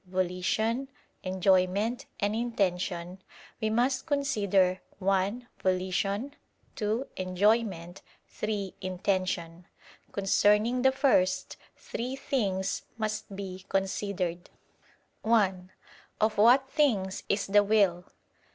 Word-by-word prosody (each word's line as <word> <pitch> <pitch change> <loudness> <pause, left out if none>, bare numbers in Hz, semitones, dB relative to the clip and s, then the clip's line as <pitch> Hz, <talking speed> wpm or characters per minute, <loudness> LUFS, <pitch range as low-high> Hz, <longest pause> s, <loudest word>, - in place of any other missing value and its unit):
"volition," 185 +8 -1 0.3
"enjoyment," 190 +4 +1
and 205 +1 0
"intention"; 185 -5 -2 0.4
we 220 - +1
must 250 +6 +1
consider: 200 - +2 0.2
(1) 195 +5 0
volition; 195 +7 -1 0.4
(2) 220 +4 -1
enjoyment; 185 -1 0 0.3
(3) 205 -3 -3
intention. 185 -2 -2 0.4
Concerning 210 +4 +3
the 265 +1 +5
first, 265 -9 +2 0.2
three 250 +3 -4
things 195 -9 -1 0.2
must 215 -2 -3
be 190 -2 -7
considered: 190 -2 -2 0.7
(1) 190 -5 +2 0.5
Of 215 -1 +1
what 250 +5 +6
things 225 -11 +1
is 200 0 +1
the 205 +1 +4
will? 200 -4 +2
200 Hz, 90 wpm, -29 LUFS, 185-225 Hz, 0.7 s, what